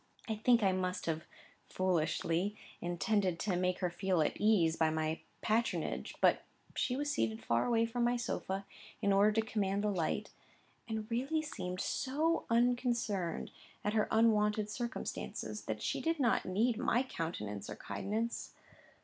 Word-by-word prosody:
I 220 Hz, -, 0 dB
think 230 Hz, +1 st, +4 dB
I 195 Hz, -, +5 dB
must 185 Hz, 0 st, -1 dB
have 160 Hz, -1 st, -2 dB, 0.4 s
(foolishly) 175 Hz, +2 st, 0 dB, 0.3 s
intended 180 Hz, +1 st, +1 dB
to 195 Hz, -4 st, 0 dB
make 180 Hz, 0 st, +1 dB
her 180 Hz, -2 st, +1 dB
feel 185 Hz, 0 st, 0 dB
at -, -, +1 dB
her -, -, -13 dB
ease, 190 Hz, -7 st, +4 dB
by 160 Hz, -1 st, +3 dB
my 155 Hz, 0 st, -1 dB, 0.2 s
patronage; 230 Hz, +2 st, 0 dB
but -, -, +4 dB, 0.3 s
she 250 Hz, -, 0 dB
was 290 Hz, +2 st, -1 dB
seated 110 Hz, -, -1 dB
far 115 Hz, -, +2 dB
away 230 Hz, -1 st, +3 dB
from 240 Hz, +1 st, -1 dB
my 240 Hz, +1 st, +3 dB
sofa, 195 Hz, -4 st, -3 dB, 0.3 s
in 200 Hz, -, +2 dB
order 200 Hz, +2 st, +5 dB
to 220 Hz, 0 st, +1 dB
command 200 Hz, -1 st, 0 dB
the 210 Hz, -, +2 dB
light, 175 Hz, -5 st, -1 dB, 0.6 s
and 220 Hz, -1 st, -3 dB
really 275 Hz, +7 st, 0 dB
seemed 185 Hz, -11 st, -4 dB
so 310 Hz, +5 st, 0 dB
unconcerned 235 Hz, -6 st, +1 dB, 0.3 s
at 210 Hz, -, 0 dB
her 215 Hz, -1 st, +2 dB
unwonted 215 Hz, -1 st, +3 dB
circumstances, 240 Hz, +1 st, -4 dB
that -, -, -3 dB
she -, -, -1 dB
did 330 Hz, -1 st, 0 dB
not 245 Hz, -4 st, +2 dB
need 220 Hz, +5 st, +1 dB
my 245 Hz, +3 st, +2 dB
countenance 105 Hz, -, -4 dB
or -, -, -5 dB
kindness. 220 Hz, +4 st, -3 dB
210 Hz, 160 wpm, -34 LUFS, 180-235 Hz, 0.6 s, I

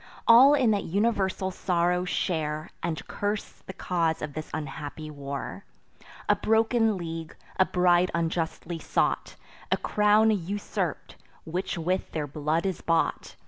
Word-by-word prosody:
All 260 Hz, +5 st, +8 dB
in 255 Hz, -6 st, +3 dB
that 205 Hz, -2 st, 0 dB
universal 190 Hz, -1 st, 0 dB
sorrow 180 Hz, -1 st, 0 dB
share, 155 Hz, -4 st, -2 dB
And 165 Hz, -2 st, -3 dB
curse 205 Hz, 0 st, -3 dB
the 190 Hz, -, -6 dB
cause 170 Hz, -3 st, -1 dB
of 150 Hz, -1 st, -5 dB
this 155 Hz, +1 st, -6 dB
unhappy 150 Hz, +1 st, -6 dB
war: 140 Hz, +6 st, -6 dB, 0.6 s
A -, -, +5 dB
broken 225 Hz, -1 st, +2 dB
league, 165 Hz, -2 st, -6 dB, 0.2 s
a 190 Hz, -, +6 dB
bride 180 Hz, 0 st, +3 dB
unjustly 165 Hz, 0 st, -2 dB
sought, -, -, 0 dB, 0.4 s
A -, -, +4 dB
crown 210 Hz, +1 st, +3 dB
usurp'd, 200 Hz, 0 st, -3 dB, 0.3 s
which 180 Hz, +3 st, -3 dB
with 180 Hz, +3 st, -2 dB
their 155 Hz, -2 st, -1 dB
blood 150 Hz, +4 st, -1 dB
is 190 Hz, -3 st, -2 dB
bought! 165 Hz, 0 st, 0 dB
175 Hz, 135 wpm, -27 LUFS, 160-200 Hz, 0.6 s, All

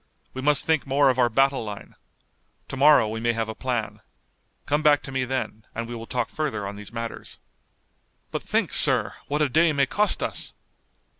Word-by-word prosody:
We 130 Hz, -, -5 dB
must 145 Hz, +1 st, +2 dB
think 160 Hz, -3 st, +1 dB
more 135 Hz, 0 st, +4 dB
of 130 Hz, -, -4 dB
our 120 Hz, -1 st, +4 dB
battle 135 Hz, +2 st, +2 dB
line. 105 Hz, -2 st, -8 dB, 0.8 s
To -, -, -5 dB
morrow 140 Hz, -4 st, +6 dB
we 110 Hz, +1 st, -4 dB
may 120 Hz, +1 st, +1 dB
have 115 Hz, -1 st, -2 dB
a 110 Hz, -, -5 dB
plan. 120 Hz, -3 st, -3 dB, 0.7 s
Come 145 Hz, +1 st, +1 dB
back 150 Hz, -2 st, +4 dB
to 135 Hz, -, -8 dB
me 130 Hz, -1 st, -1 dB
then, 125 Hz, -4 st, -4 dB
and 115 Hz, 0 st, -4 dB
we 120 Hz, -, -7 dB
will 115 Hz, -1 st, -7 dB
talk 125 Hz, -2 st, -2 dB
further 135 Hz, -10 st, -3 dB
on 100 Hz, -, -6 dB
these 105 Hz, +1 st, -10 dB
matters." 115 Hz, 0 st, -7 dB, 0.9 s
"But -, -, -3 dB
think, -, -, -1 dB
sir, -, -, +3 dB
what 150 Hz, +1 st, 0 dB
a -, -, +2 dB
day 160 Hz, +5 st, +4 dB
may 140 Hz, -1 st, +3 dB
cost 205 Hz, +11 st, +1 dB
us!" -, -, -4 dB
130 Hz, 200 wpm, -24 LUFS, 115-145 Hz, 0.9 s, morrow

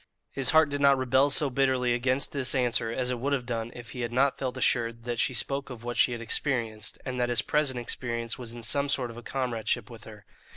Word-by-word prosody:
His 135 Hz, -2 st, +2 dB
heart 160 Hz, -2 st, +5 dB
did 145 Hz, 0 st, -2 dB
not 140 Hz, -1 st, +5 dB
rebel 130 Hz, +2 st, +3 dB
so 140 Hz, 0 st, +3 dB
bitterly 130 Hz, -2 st, +2 dB
against 130 Hz, +3 st, 0 dB
this 135 Hz, -2 st, 0 dB
answer 120 Hz, -3 st, +1 dB
as 125 Hz, +2 st, -2 dB
it 125 Hz, -, -3 dB
would 140 Hz, +4 st, -1 dB
have 130 Hz, -3 st, -1 dB
done 115 Hz, -1 st, -3 dB
if 120 Hz, -1 st, -10 dB
he 125 Hz, -, -6 dB
had 120 Hz, 0 st, -3 dB
not 135 Hz, +3 st, +2 dB
felt 130 Hz, -2 st, -3 dB
assured 115 Hz, -1 st, 0 dB
that 120 Hz, -1 st, -3 dB
she 125 Hz, -, +1 dB
spoke 135 Hz, +4 st, -2 dB
of 120 Hz, -3 st, -9 dB
what 120 Hz, 0 st, -4 dB
she -, -, +3 dB
had 120 Hz, -1 st, -4 dB
experienced, 115 Hz, -3 st, 0 dB
and 125 Hz, -1 st, -4 dB
that 120 Hz, 0 st, +1 dB
his 120 Hz, -2 st, +1 dB
present 145 Hz, -4 st, 0 dB
experience 115 Hz, -1 st, -3 dB
was 120 Hz, -3 st, -6 dB
in 120 Hz, 0 st, -8 dB
some 140 Hz, +4 st, +2 dB
sort 125 Hz, -4 st, -1 dB
a 120 Hz, -, -9 dB
comradeship 120 Hz, -2 st, -2 dB
with 115 Hz, -, -12 dB
her. 105 Hz, -2 st, -13 dB
125 Hz, 240 wpm, -28 LUFS, 115-135 Hz, -, heart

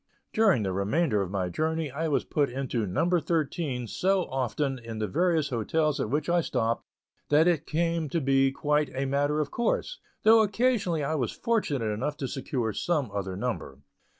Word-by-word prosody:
During 200 Hz, -, +4 dB
the 95 Hz, -, -1 dB
remainder 105 Hz, -, +1 dB
of 95 Hz, -, -3 dB
my 95 Hz, -2 st, -1 dB
journey, 160 Hz, -, -1 dB
I 160 Hz, +5 st, -2 dB
was 150 Hz, -, +1 dB
put 145 Hz, -2 st, +1 dB
into 125 Hz, -4 st, -2 dB
"number 170 Hz, -, +2 dB
thirteen" 155 Hz, -6 st, -1 dB
so 190 Hz, -, +1 dB
often 135 Hz, +1 st, -1 dB
in 115 Hz, -1 st, -7 dB
the 110 Hz, -, -1 dB
various 165 Hz, -, +1 dB
hotels 150 Hz, +5 st, 0 dB
at -, -, -1 dB
which 150 Hz, +5 st, -1 dB
I 175 Hz, 0 st, +3 dB
stopped 115 Hz, -6 st, -1 dB, 0.4 s
that 155 Hz, +3 st, +5 dB
it 165 Hz, -3 st, +1 dB
came 165 Hz, -1 st, 0 dB
to 165 Hz, -, 0 dB
be 135 Hz, -1 st, +3 dB
quite 150 Hz, +1 st, +1 dB
a 135 Hz, +1 st, -1 dB
matter 145 Hz, +2 st, +1 dB
of 150 Hz, -2 st, -1 dB
course, 360 Hz, -, -1 dB, 0.2 s
though 220 Hz, +1 st, +7 dB
occasionally 205 Hz, -, +1 dB
I 140 Hz, -, -1 dB
was 130 Hz, -7 st, -1 dB
fortunate 205 Hz, -, -1 dB
enough 125 Hz, +8 st, -2 dB
to 135 Hz, -, -3 dB
secure 125 Hz, -4 st, -2 dB
some 150 Hz, -10 st, -1 dB
other 95 Hz, -2 st, -3 dB
number. 115 Hz, -, -4 dB
145 Hz, 180 wpm, -28 LUFS, 120-165 Hz, 0.4 s, though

